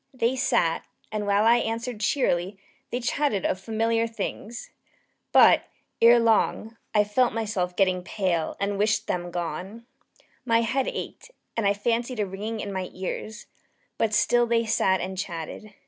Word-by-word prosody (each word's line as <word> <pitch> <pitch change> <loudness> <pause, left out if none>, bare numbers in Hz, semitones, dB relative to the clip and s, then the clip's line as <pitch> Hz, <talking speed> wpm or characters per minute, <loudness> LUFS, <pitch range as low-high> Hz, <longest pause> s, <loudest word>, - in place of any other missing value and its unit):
They 245 +1 +1
sat, 240 -11 +1 0.3
and 210 -1 -3
while 200 +1 +3
I 235 +1 +6
answered 230 0 -3
cheerily, 200 -5 0 0.3
they 245 - -2
chatted 250 -4 0
of 185 - 0
familiar 225 +2 0
things. 225 +1 -6 0.6
But, - - +6 0.4
ere 235 +1 +8
long, 225 0 +1 0.2
I 210 -1 +4
felt 235 +4 +1
myself 205 -5 -2
getting 185 -2 +2
pale 180 -4 -1
and 200 0 -1
wished 215 +2 +2
them 175 0 -2
gone. 180 +6 -5 0.6
My 230 -2 +3
head 255 +4 0
ached, - - -6 0.3
and 225 -3 +1
I 200 - +2
fancied 235 +3 -1
a 210 - +1
ringing 210 +3 -5
in 200 - -5
my 185 -1 -3
ears: 210 +3 -5 0.5
but 225 - +2
still 240 +3 +3
they 230 0 +2
sat 195 -4 +2
and 190 0 -4
still 195 - -2
chatted. 195 +6 -8
215 Hz, 160 wpm, -26 LUFS, 190-230 Hz, 0.6 s, ere